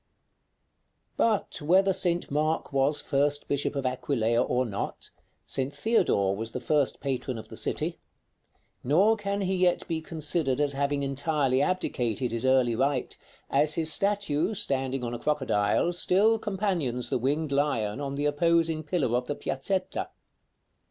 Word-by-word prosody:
§ -, -, -48 dB
III. -, -, -48 dB
But 215 Hz, -8 st, 0 dB
whether 190 Hz, +5 st, +4 dB
St. 175 Hz, -3 st, 0 dB
Mark 155 Hz, +1 st, -1 dB
was 140 Hz, +2 st, +2 dB
first 145 Hz, +1 st, 0 dB
bishop 145 Hz, +1 st, -1 dB
of 140 Hz, -1 st, -2 dB
Aquileia 120 Hz, -2 st, 0 dB
or 125 Hz, 0 st, +1 dB
not, 100 Hz, -4 st, -5 dB, 0.3 s
St. 135 Hz, +1 st, -2 dB
Theodore 120 Hz, -, +1 dB
was 115 Hz, +2 st, -5 dB
the -, -, -3 dB
first 145 Hz, +2 st, 0 dB
patron 130 Hz, -3 st, -3 dB
of 110 Hz, -, -9 dB
the -, -, -9 dB
city; -, -, -2 dB, 0.8 s
nor 185 Hz, -, +4 dB
can 200 Hz, -1 st, -3 dB
he 190 Hz, 0 st, 0 dB
yet 180 Hz, -1 st, +1 dB
be 165 Hz, -2 st, -2 dB
considered 155 Hz, -4 st, -1 dB
as 145 Hz, -1 st, +2 dB
having 140 Hz, +1 st, -1 dB
entirely 140 Hz, -1 st, 0 dB
abdicated 130 Hz, -, -1 dB
his 115 Hz, +2 st, -1 dB
early 130 Hz, -3 st, +3 dB
right, 135 Hz, +1 st, 0 dB, 0.4 s
as 150 Hz, +2 st, +2 dB
his 160 Hz, -1 st, +2 dB
statue, 200 Hz, -2 st, 0 dB
standing 135 Hz, -5 st, -1 dB
on 120 Hz, 0 st, -3 dB
a 120 Hz, -, -4 dB
crocodile, 135 Hz, 0 st, +1 dB
still 200 Hz, +6 st, +3 dB
companions 185 Hz, -, -1 dB
the -, -, +1 dB
winged 145 Hz, +4 st, -1 dB
lion 140 Hz, -5 st, 0 dB
on 140 Hz, -1 st, -3 dB
the 145 Hz, +1 st, -1 dB
opposing 165 Hz, +2 st, +2 dB
pillar 150 Hz, -6 st, 0 dB
of 125 Hz, 0 st, -1 dB
the 145 Hz, -, -2 dB
piazzetta. 160 Hz, +10 st, -2 dB
145 Hz, 155 wpm, -27 LUFS, 130-170 Hz, 0.8 s, whether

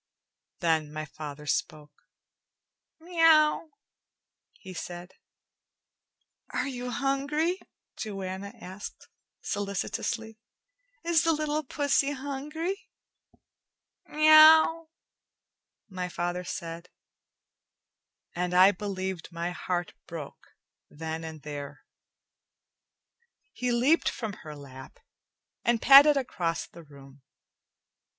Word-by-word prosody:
Then 160 Hz, -3 st, +1 dB
my 155 Hz, 0 st, -5 dB
father 150 Hz, 0 st, -9 dB
spoke. 150 Hz, -1 st, -4 dB, 0.9 s
"Meow," 325 Hz, -2 st, +4 dB, 0.8 s
he 190 Hz, -2 st, -11 dB
said. 175 Hz, 0 st, -7 dB, 1.4 s
"Are 250 Hz, -, -2 dB
you 250 Hz, -2 st, -5 dB
hungry?" 285 Hz, +7 st, 0 dB, 0.4 s
Joanna 195 Hz, -2 st, -5 dB
asked 190 Hz, 0 st, -9 dB, 0.3 s
solicitously. 215 Hz, +2 st, -3 dB, 0.6 s
"Is 335 Hz, -1 st, +3 dB
the 330 Hz, -1 st, +3 dB
little 305 Hz, 0 st, -1 dB
pussy 285 Hz, 0 st, +1 dB
hungry?" 295 Hz, +7 st, -5 dB, 1.2 s
"Meow," 310 Hz, +1 st, +7 dB, 1.0 s
my 185 Hz, -3 st, -5 dB
father 175 Hz, +1 st, -3 dB
said, 170 Hz, 0 st, -6 dB, 1.4 s
and 180 Hz, 0 st, -2 dB
I 185 Hz, +2 st, +8 dB
believed 190 Hz, -3 st, -5 dB
my 170 Hz, +1 st, -3 dB
heart 175 Hz, -1 st, -3 dB
broke 160 Hz, -4 st, -9 dB, 0.4 s
then 160 Hz, +1 st, -5 dB
and 160 Hz, -2 st, -8 dB
there. 145 Hz, -1 st, -7 dB, 1.7 s
He 250 Hz, 0 st, -2 dB
leaped 255 Hz, +8 st, +3 dB
from 220 Hz, -4 st, -5 dB
her 155 Hz, -2 st, -9 dB
lap 130 Hz, -2 st, -12 dB, 0.7 s
and 235 Hz, -1 st, +2 dB
padded 280 Hz, +4 st, +8 dB
across 175 Hz, -11 st, -2 dB
the 170 Hz, -, -14 dB
room. 140 Hz, -2 st, -16 dB
195 Hz, 85 wpm, -28 LUFS, -, 1.7 s, I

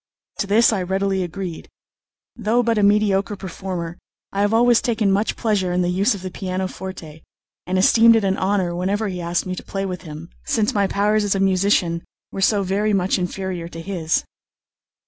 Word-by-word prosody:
To 200 Hz, -, -1 dB
this 220 Hz, +3 st, +4 dB
I 195 Hz, -, -1 dB
readily 190 Hz, +1 st, 0 dB
agreed. 180 Hz, -1 st, -6 dB, 0.7 s
Though 235 Hz, +2 st, +1 dB
but 230 Hz, -2 st, +1 dB
a -, -, +2 dB
mediocre 205 Hz, 0 st, +2 dB
performer, 180 Hz, -3 st, -6 dB, 0.3 s
I 200 Hz, -, -1 dB
have 205 Hz, 0 st, +2 dB
always 235 Hz, +1 st, +4 dB
taken 220 Hz, -4 st, +1 dB
much 205 Hz, +3 st, +1 dB
pleasure 205 Hz, -6 st, 0 dB
in 180 Hz, 0 st, +1 dB
the 175 Hz, -, 0 dB
use 200 Hz, +5 st, +2 dB
of 190 Hz, -, -9 dB
the 185 Hz, -, -5 dB
pianoforte, 185 Hz, -4 st, -5 dB, 0.5 s
and 185 Hz, +1 st, 0 dB
esteemed 230 Hz, +4 st, +6 dB
it 225 Hz, -, +2 dB
an 195 Hz, -1 st, +1 dB
honour 190 Hz, -3 st, 0 dB
whenever 200 Hz, +4 st, -1 dB
he 180 Hz, -2 st, -5 dB
asked 170 Hz, +1 st, -1 dB
me 185 Hz, 0 st, -3 dB
to -, -, -8 dB
play 195 Hz, 0 st, -4 dB
with 180 Hz, -3 st, -5 dB
him, 160 Hz, 0 st, -9 dB
since 215 Hz, -2 st, 0 dB
my 200 Hz, -2 st, +2 dB
powers 210 Hz, +2 st, +1 dB
as 200 Hz, -1 st, +1 dB
a -, -, 0 dB
musician 185 Hz, -3 st, +2 dB, 0.3 s
were 195 Hz, -, -5 dB
so 200 Hz, 0 st, +3 dB
very 205 Hz, +3 st, 0 dB
much 190 Hz, -1 st, +1 dB
inferior 180 Hz, -1 st, -4 dB
to 165 Hz, -1 st, -9 dB
his. 165 Hz, -3 st, -1 dB
195 Hz, 190 wpm, -21 LUFS, 180-205 Hz, 0.7 s, esteemed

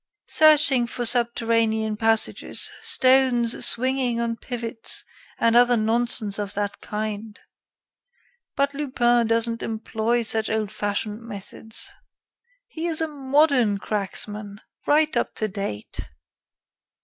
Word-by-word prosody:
Searching 300 Hz, -5 st, +5 dB
for 240 Hz, +1 st, -4 dB
subterranean 230 Hz, -2 st, +1 dB
passages, 225 Hz, 0 st, -1 dB
stones 255 Hz, -3 st, +3 dB
swinging 255 Hz, -1 st, +1 dB
on 230 Hz, 0 st, -1 dB
pivots, 230 Hz, -2 st, -4 dB, 0.3 s
and 230 Hz, 0 st, +2 dB
other 245 Hz, 0 st, +5 dB
nonsense 220 Hz, -2 st, +3 dB
of 205 Hz, -1 st, -5 dB
that 205 Hz, 0 st, -3 dB
kind. 215 Hz, 0 st, -5 dB, 1.2 s
But 280 Hz, 0 st, 0 dB
Lupin 240 Hz, -5 st, +1 dB
doesn't 230 Hz, 0 st, 0 dB
employ 225 Hz, +1 st, -2 dB
such 220 Hz, 0 st, -1 dB
old 220 Hz, -2 st, -2 dB
fashioned 205 Hz, +1 st, -3 dB
methods. 220 Hz, 0 st, -6 dB, 0.8 s
He 335 Hz, -7 st, -5 dB
is 325 Hz, -2 st, 0 dB
a 320 Hz, -, 0 dB
modern 275 Hz, -6 st, +2 dB
cracksman, 205 Hz, 0 st, -4 dB, 0.3 s
right 305 Hz, +1 st, +3 dB
up -, -, -1 dB
to 215 Hz, -, -1 dB
date." 195 Hz, -, -6 dB
230 Hz, 110 wpm, -23 LUFS, 215-255 Hz, 1.2 s, Searching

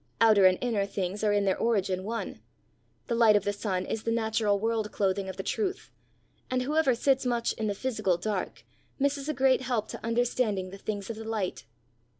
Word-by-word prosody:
Outer 215 Hz, -4 st, +7 dB
and 185 Hz, 0 st, +3 dB
inner 220 Hz, -5 st, 0 dB
things 195 Hz, +1 st, -3 dB
are 210 Hz, -, +3 dB
in 205 Hz, -1 st, +2 dB
their 190 Hz, -, +1 dB
origin 195 Hz, -5 st, 0 dB
one; 230 Hz, +3 st, -4 dB, 0.6 s
the 240 Hz, -, -2 dB
light 230 Hz, -2 st, +5 dB
of 205 Hz, -, +3 dB
the 205 Hz, -, -1 dB
sun 190 Hz, -3 st, -2 dB
is 225 Hz, -, -3 dB
the 230 Hz, -, -2 dB
natural 220 Hz, -2 st, +1 dB
world 220 Hz, 0 st, -1 dB
clothing 195 Hz, -1 st, 0 dB
of 190 Hz, -, -7 dB
the 195 Hz, -, -4 dB
truth, 390 Hz, -, -2 dB, 0.6 s
and 255 Hz, 0 st, 0 dB
whoever 295 Hz, -2 st, +2 dB
sits 270 Hz, +2 st, +2 dB
much 240 Hz, -2 st, 0 dB
in 220 Hz, -, -3 dB
the 205 Hz, -, -1 dB
physical 215 Hz, -6 st, 0 dB
dark 200 Hz, +1 st, -4 dB, 0.3 s
misses 280 Hz, +1 st, 0 dB
a -, -, +1 dB
great 260 Hz, -1 st, +3 dB
help 240 Hz, -4 st, -1 dB
to -, -, -8 dB
understanding 230 Hz, -5 st, 0 dB
the 195 Hz, -, -10 dB
things 205 Hz, 0 st, -4 dB
of 220 Hz, -, -7 dB
the 225 Hz, -, -6 dB
light. 215 Hz, -, -3 dB
220 Hz, 200 wpm, -28 LUFS, 200-240 Hz, 0.6 s, Outer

